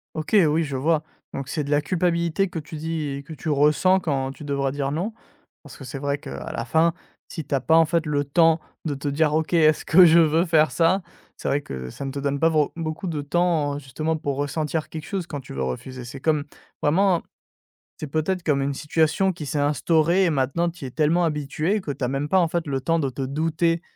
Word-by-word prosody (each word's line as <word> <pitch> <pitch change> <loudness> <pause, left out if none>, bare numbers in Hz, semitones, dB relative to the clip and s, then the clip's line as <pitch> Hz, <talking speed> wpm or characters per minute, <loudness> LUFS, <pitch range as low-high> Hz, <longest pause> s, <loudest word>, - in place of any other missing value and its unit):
OK, 155 +6 -5
oui, 160 +2 +2
je 140 -3 -3
vois. 155 +2 +1 0.3
Donc 135 -1 -5
c'est 150 -2 -2
de - - -7
la 145 0 +3
culpabilité 170 +2 0
que 175 - -7
tu 155 +1 -8
dis 160 +1 -3
et 140 - -7
que 160 - -9
tu 155 - -5
ressens 150 +6 +3
quand 135 -5 -1
tu 150 +2 -11
devrais 140 -1 -1
dire 140 0 -2
non, 195 +8 -2 0.5
parce - - -13
que 135 - -11
c'est 130 +2 -6
vrai, 140 0 -1
qu'à 160 +2 -7
la - - -3
fin, 165 +1 +2 0.3
si 160 - -6
tu 140 - -6
as 135 - +3
pas, 160 +6 +2
en 165 0 +6
fait, 165 0 0
le 145 -1 0
temps 165 +3 +3 0.2
de 145 -3 -1
te 140 +1 -3
dire: 150 +1 +1
«OK. 160 +1 0
Est-ce 155 -2 +4
que 180 +2 +7
je 170 +1 +7
veux 165 +2 +3
faire 155 -2 +3
ça?» 175 +3 +2 0.4
C'est - - -3
vrai 145 - +1
que 65 - -7
ça 140 - -7
ne 135 - -3
te 140 - -5
donne 140 0 -1
pas 165 - +4
vrau 155 -3 +1
beaucoup 160 +3 -4
de 155 -3 -2
temps, 155 -2 +1
heu, 145 - -4
justement 155 +4 -3
pour 140 -3 -3
ressentir 150 +2 -2
quelque 155 -2 -7
chose 190 -4 -3
quand 145 -3 -5
tu - - -13
veux 65 -1 -2
refuser. 125 - -5
C'est 130 +2 -9
comme 150 -2 +1 0.4
vraiment, 180 +3 +3 0.8
c'est 155 - -5
peut-être 160 +5 -1
comme 140 -3 +1
une 140 0 -1
situation 160 +6 +1
qui 155 -3 -7
s'est 145 +1 -2
instaurée 160 +5 +2
et 175 - +3
maintenant 145 +5 0
tu 165 -5 -10
y - - -3
es - - -9
tellement 160 +4 +2
habitué 155 +6 -1
que 145 - -4
tu 135 - -6
as 125 - +2
même 135 +3 -2
pas, 190 - +4
en 170 - +3
fait, 170 0 -2
le 135 -2 -2
temps 165 +4 +1
de 140 -3 0
te 135 +2 -6
douter 165 +4 0
155 Hz, 245 wpm, -24 LUFS, 140-165 Hz, 0.8 s, que